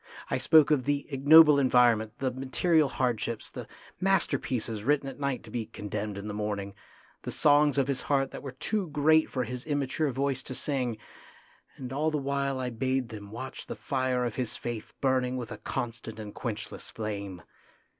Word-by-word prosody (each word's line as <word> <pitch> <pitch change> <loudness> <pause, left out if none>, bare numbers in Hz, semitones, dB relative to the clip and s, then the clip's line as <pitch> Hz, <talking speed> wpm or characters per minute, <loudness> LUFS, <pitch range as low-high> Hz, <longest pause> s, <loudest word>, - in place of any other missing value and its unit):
I - - +1
spoke 155 -2 +5
of 140 -4 +2
the 145 0 0
ignoble 145 +2 +7
environment, 120 -5 +4
the 130 -1 -1
material 140 +4 +2
hardships, 115 -3 -2
the - - -7 0.3
masterpieces 130 - 0
written 140 +2 +2
at 135 - -7
night 140 -2 -2
to - - -12
be 115 -3 -3
con 105 -2 -8
demned 105 -1 -3
in 100 +1 -6
the 105 - -4
morning, 100 -1 -3 0.5
the - - -6
songs 145 -1 +4
of 135 -1 +2
his 140 -2 -1
heart 135 -2 +1
that - - -7
were 135 - -6
too 200 +8 -2
great 155 +2 +4
for 130 - -1
his 125 +1 -5
immature 145 0 -1
voice 135 0 -1
to 130 - -7
sing; 125 -6 -1 0.8
and 130 -1 -6
all 150 +3 +1
the 155 - -1
while 140 -1 -1
I 125 -1 -2
bade 130 +1 -1
them 105 -3 -9
watch 130 +4 -7
the - - -5
fire 130 -2 -1
of 120 - -4
his 125 -3 -2
faith 120 -3 -5
burning 130 -1 +1
with 120 -3 -6
a 105 - -7
constant 115 -3 -5
and 105 -2 -7
quenchless - - -5
flame. 100 -5 -5
130 Hz, 185 wpm, -29 LUFS, 115-140 Hz, 0.8 s, ignoble